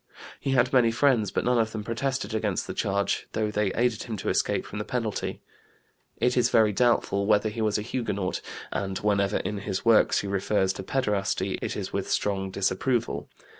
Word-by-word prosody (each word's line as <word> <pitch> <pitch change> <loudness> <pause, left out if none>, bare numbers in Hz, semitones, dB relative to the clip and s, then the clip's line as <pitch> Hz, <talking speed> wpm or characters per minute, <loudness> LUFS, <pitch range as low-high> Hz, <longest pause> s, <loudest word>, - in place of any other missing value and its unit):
He 135 - -1
had 125 0 +3
many 125 -3 +5
friends 120 -4 +3
but - - -1
none 125 -1 +3
of 110 -1 0
them 110 -2 -4
protested 125 0 -2
against 105 -4 -1
the - - -5
charge, 100 0 -1
though 110 -1 0
they 105 -2 0
aided 120 -2 +1
him 110 -3 -4
to - - -3
escape - - +1
from - - -6
the - - -2
penalty. - - -3 0.7
It 125 0 +1
is 125 -2 +3
very 110 -3 +4
doubtful 100 -3 +2
whether 105 0 +3
he 110 +2 -5
was 110 -1 +1
a 105 - -3
Huguenot, 105 -6 -2 0.3
and 95 -1 -2
whenever 100 -1 +1
in 105 -1 -3
his 95 0 -4
works 115 -1 +5
he 100 - -5
refers 95 0 +1
to 95 - -7
pederasty 105 -4 -1
it - - -3
is - - -5
with - - -2
strong 95 -2 0
disapproval. 95 - -1
105 Hz, 195 wpm, -27 LUFS, 100-120 Hz, 0.7 s, many